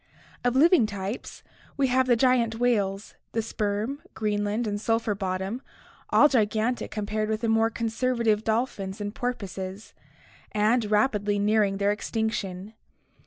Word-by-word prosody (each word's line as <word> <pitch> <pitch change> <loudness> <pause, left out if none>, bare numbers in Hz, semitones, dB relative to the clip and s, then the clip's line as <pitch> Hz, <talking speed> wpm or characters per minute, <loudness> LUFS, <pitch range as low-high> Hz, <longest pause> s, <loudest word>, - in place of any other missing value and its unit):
Of 245 0 +1
living 305 - +5
types, 200 +3 -6 0.3
we 280 - +3
have 260 +1 +2
the 245 - +5
giant 235 -2 +2
whales, 210 -4 0 0.2
the 225 - +1
sperm, 215 +5 -2
Greenland, 210 +1 -1
and 205 -1 -2
sulphur 225 -1 +1
bottom, 190 +4 -3 0.5
all 295 - +6
gigantic 225 -1 0
compared 215 0 -2
with 220 0 -1
the 230 - 0
more 225 0 +3
conserva 235 +2 -1
tive 215 -1 +2
dolphins 220 -4 -1
and 205 0 -4
porpoises, 195 -5 -5 0.6
and 215 +1 +2
rapidly 210 -1 +2
nearing 205 -1 +2
their 200 +1 +2
extinction. 210 -2 -3
215 Hz, 135 wpm, -26 LUFS, 205-235 Hz, 0.6 s, all